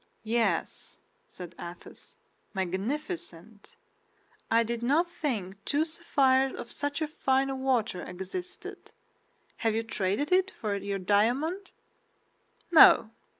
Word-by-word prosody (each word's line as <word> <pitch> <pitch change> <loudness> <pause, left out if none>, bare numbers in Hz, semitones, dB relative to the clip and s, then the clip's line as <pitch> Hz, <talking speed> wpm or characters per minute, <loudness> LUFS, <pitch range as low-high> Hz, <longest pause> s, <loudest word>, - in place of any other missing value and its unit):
"Yes," 230 +1 -1 0.3
said 180 -1 -10
Athos, 175 +1 -9 0.4
"magnificent. 205 - -4 0.7
I 230 +1 +4
did 235 0 -3
not 310 +8 +2
think 205 - -4
two 295 +7 +1
sapphires 270 -5 +2
of - - -8
such 290 +2 -2
a - - -1
fine 270 -2 0
water 235 -8 0
existed. 190 - -7 0.6
Have 225 -2 0
you 225 - 0
traded 215 - -1
it 375 +1 +4
for 210 -3 -1
your 200 0 -3
diamond?" 245 - +1 1.0
"No. 310 -8 +8
235 Hz, 105 wpm, -29 LUFS, 200-295 Hz, 1.0 s, No